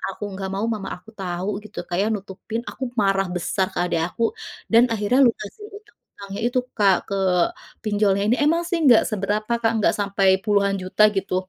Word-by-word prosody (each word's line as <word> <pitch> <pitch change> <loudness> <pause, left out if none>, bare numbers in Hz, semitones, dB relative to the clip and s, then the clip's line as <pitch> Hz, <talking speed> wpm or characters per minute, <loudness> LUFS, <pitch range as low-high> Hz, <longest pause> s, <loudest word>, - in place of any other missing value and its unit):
aku - - -8
enggak 190 0 -5
mau 205 - -1
mama 195 -3 -5
aku 200 - -18
tahu 185 0 -3
gitu 215 -1 -15
Kak 175 - -3
ya 205 - +1
aku - - +1
nutupin 205 +4 -6
aku 265 - -7 0.2
marah 195 -1 +2
besar 185 +2 0
ke - - -8
adik 165 -2 0
aku, 230 - -3 0.5
dan 230 +1 +7
akhirnya 215 +4 +1
lunasin 235 - -2
hutang-hutangnya 410 - -11
itu 250 +1 +1 0.2
Kak 200 -3 +5
ke 200 - -2 0.7
pinjolnya 205 -2 +1
ini 240 - +3
emang 330 +3 +3
sih 345 - 0
enggak 245 -6 +6
seberapa 210 +1 -2
Kak 225 - +2
enggak - - +3
sampai 200 -1 +1 0.2
puluhan 200 -2 +2
juta 185 +3 +1
gitu. 195 -1 -1
205 Hz, 190 wpm, -22 LUFS, 195-225 Hz, 0.7 s, dan